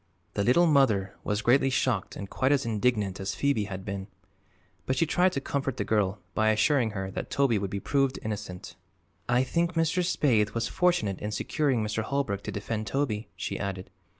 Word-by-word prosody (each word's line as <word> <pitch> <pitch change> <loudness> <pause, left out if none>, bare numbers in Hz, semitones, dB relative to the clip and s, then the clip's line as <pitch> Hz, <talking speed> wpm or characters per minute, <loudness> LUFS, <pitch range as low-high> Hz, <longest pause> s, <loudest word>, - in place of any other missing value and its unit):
The 100 - 0
Little 130 +11 +5
Mother 115 - +3
was 105 +1 -1
greatly 135 +3 +4
shocked 125 -5 0
and 100 - -6
quite 130 +7 0
as 140 -3 +2
indignant 105 -3 0
as 95 - -3
Phoebe 140 -7 +1
had 95 -1 -7
been. 100 -1 -4 0.8
But 130 - +1
she 150 - +2
tried 180 +4 +3
to 140 - 0
comfort 135 -2 -2
the - - 0
girl 105 -2 +1 0.2
by 110 0 +2
assuring 115 +3 +3
her 95 0 -3
that - - -5
Toby 135 -6 +2
would 100 -1 -3
be 100 - -3
proved 135 +3 +1
innocent. 105 -4 -6 0.5
"I 125 +1 +4
think 170 +5 0
Mr. 165 +2 +2
Spaythe 115 - +2
was 115 - 0
fortunate 175 - +1
in 105 - -2
securing 130 +2 0
Mr. 105 +1 -1
Holbrook 110 -4 -1
to - - -3
defend 110 +1 -3
Toby," 115 -6 -1
she 95 - -4
added. 95 -2 -4
110 Hz, 190 wpm, -28 LUFS, 100-140 Hz, 0.8 s, Little